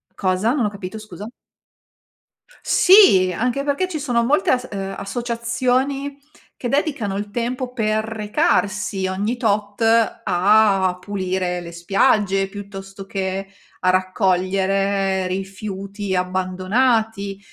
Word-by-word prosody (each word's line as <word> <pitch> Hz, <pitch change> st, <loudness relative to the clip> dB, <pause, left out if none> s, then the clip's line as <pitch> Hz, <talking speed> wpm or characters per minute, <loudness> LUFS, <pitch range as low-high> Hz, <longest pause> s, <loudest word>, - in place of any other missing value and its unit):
Cosa? 190 Hz, +4 st, +1 dB
Non 265 Hz, -6 st, +1 dB
ho -, -, +1 dB
capito, 200 Hz, 0 st, -7 dB
scusa. 210 Hz, -1 st, -9 dB, 1.3 s
Sì, 360 Hz, -, +6 dB
anche 250 Hz, +4 st, 0 dB
perché 290 Hz, +6 st, 0 dB
ci 320 Hz, -4 st, -4 dB
sono 245 Hz, -5 st, +1 dB
molte 300 Hz, +9 st, +2 dB
as 255 Hz, 0 st, 0 dB
uhm, 195 Hz, -1 st, -4 dB
associazioni 245 Hz, +6 st, -1 dB, 0.4 s
che 245 Hz, -, -4 dB
dedicano 270 Hz, -8 st, -1 dB
il 205 Hz, +1 st, -4 dB
tempo 245 Hz, +3 st, -3 dB
per 220 Hz, -2 st, 0 dB
recarsi 210 Hz, -, 0 dB
ogni 200 Hz, +5 st, -1 dB
tot 210 Hz, -2 st, -1 dB, 0.4 s
a 195 Hz, -1 st, +3 dB
pulire 185 Hz, -2 st, -2 dB
le 170 Hz, -1 st, -9 dB
spiagge, 195 Hz, +2 st, +1 dB
piuttosto 195 Hz, -1 st, -9 dB
che 195 Hz, 0 st, -3 dB, 0.3 s
a 185 Hz, -, +2 dB
raccogliere 190 Hz, +1 st, +1 dB
rifiuti 195 Hz, +1 st, -4 dB
abbandonati. 195 Hz, +3 st, 0 dB
200 Hz, 110 wpm, -21 LUFS, 190-235 Hz, 1.3 s, Sì